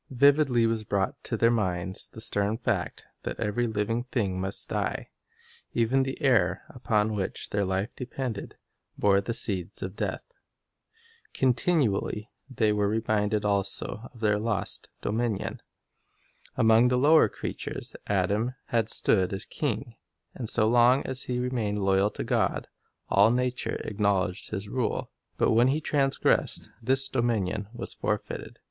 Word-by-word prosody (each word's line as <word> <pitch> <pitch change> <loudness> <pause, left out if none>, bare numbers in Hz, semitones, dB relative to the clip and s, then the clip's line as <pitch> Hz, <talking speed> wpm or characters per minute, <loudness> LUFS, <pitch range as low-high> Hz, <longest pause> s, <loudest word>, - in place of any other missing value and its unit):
Vividly 135 -2 +4
was 115 -1 0
brought 100 -2 -1
to - - -2
their 115 - +4
minds 95 -4 0
the 110 - -10
stern 105 -1 0
fact 115 -6 -2 0.2
that - - -5
every 120 +4 0
living 110 +2 -1
thing 100 -7 -1
must 95 +1 -3
die. - - -2 0.6
Even 120 +3 +3
the 135 0 -3
air, 130 -4 +3
upon 110 -4 0
which 100 -3 -4
their 100 0 +1
life 95 +4 -2
depended, 125 -4 -5 0.4
bore 100 -1 +4
the 115 +4 -2
seeds 95 -7 -1
of 95 +1 -5
death. - - -3 1.1
Continually 125 - +1 0.2
they 110 -5 +1
were 105 -1 +1
reminded 105 -1 0
also 100 +3 -2
of 115 - -16
their 105 -1 +2
lost 110 -3 -2
dominion. 110 -2 -2 1.0
Among 115 0 +5
the 125 0 +2
lower 155 +5 +6
creatures - - -5
Adam 105 +6 0
had 115 -2 +1
stood 95 -5 +2
as 95 -1 -4
king, - - -3 0.4
and 115 -4 -2
so 110 -2 +4
long 120 +3 +5
as 130 0 -3
he 125 - -2
remained 120 -5 -1
loyal 95 +1 +3
to - - -5
God, - - 0 0.4
all 100 +2 +5
nature 125 +1 0
acknowledged 100 -2 0
his 105 -1 -4
rule; 125 +3 -2 0.3
but - - +3
when 120 +3 +5
he 140 +4 +2
transgressed, 140 -3 +1
this 135 +3 +2
dominion 110 -5 -1
was 120 0 -7
forfeited. - - -3
110 Hz, 140 wpm, -27 LUFS, 100-125 Hz, 1.1 s, lower